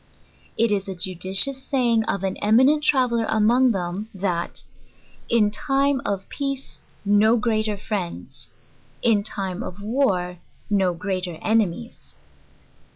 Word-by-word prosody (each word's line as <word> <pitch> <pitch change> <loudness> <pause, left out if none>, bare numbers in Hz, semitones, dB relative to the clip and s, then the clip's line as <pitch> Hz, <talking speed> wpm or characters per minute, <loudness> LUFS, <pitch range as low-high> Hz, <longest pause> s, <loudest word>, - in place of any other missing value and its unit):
It 230 -1 +2
is 200 -1 0
a 190 - -5
judicious 190 +9 0
saying 240 -5 +1
of 195 -2 -2
an 190 -1 -1
eminent 260 +8 +4
traveller 250 -5 +2
arptngthem, 215 -4 +2
that, 180 -3 -2 0.7
"in 215 -3 +3
time 275 +2 +1
of 195 -1 -3
peace 275 -1 -5 0.2
no 210 +3 +4
greater 215 -2 0
friend?, 195 -4 -4 0.8
in 225 -4 +4
time 195 -2 -4
of 185 -5 -7
war 190 -7 0 0.3
no 190 -3 +2
greater 185 -2 -3
enemies." 220 +1 -1
210 Hz, 115 wpm, -23 LUFS, 190-240 Hz, 0.8 s, eminent